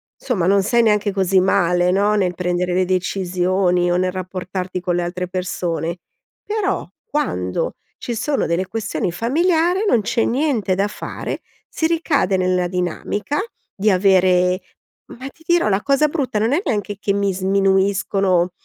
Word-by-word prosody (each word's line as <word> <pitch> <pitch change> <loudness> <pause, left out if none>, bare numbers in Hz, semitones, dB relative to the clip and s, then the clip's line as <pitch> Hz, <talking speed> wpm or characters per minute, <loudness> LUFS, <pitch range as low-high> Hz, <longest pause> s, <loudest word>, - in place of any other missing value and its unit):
somma 200 -10 -1
non 200 0 +4
sei 235 +2 +3
neanche 210 -2 +2
così 190 -1 +2
male 180 -2 +2
no, 205 +2 +2
nel 180 -3 0
prendere 180 0 -1
le 185 0 +2
decisioni 180 -1 0
o 175 - +2
nel 185 0 +1
rapportarti 185 0 -4
con 175 -1 -1
le 175 - 0
altre 180 +1 -3
persone. 175 -2 -3 0.5
Però, 415 - -2 0.2
quando 90 - -2 0.2
ci 240 - -4
sono 285 +5 0
delle 175 +3 -1
questioni 210 -5 -2
familiari, 335 - +1
non 235 - +3
c'è 225 +3 0
niente 245 -7 0
da 200 +2 +1
fare, 210 - -6 0.3
si 320 - 0
ricade 290 - +1
nel 180 -1 +1
dinamica, 185 - -2 0.4
di 210 +2 +1
avere 185 -1 +3 0.5
ma 260 +3 -8
ti 320 - -24
dirò, 345 -9 +3
la 195 0 +1
cosa 280 +2 +3
brutta 270 -8 -2
non 225 +4 +1
è 340 - +2
neanche 205 -5 -2
che 200 - 0
mi 200 -1 0
sminuiscono 195 -1 +1
195 Hz, 155 wpm, -20 LUFS, 180-225 Hz, 0.5 s, non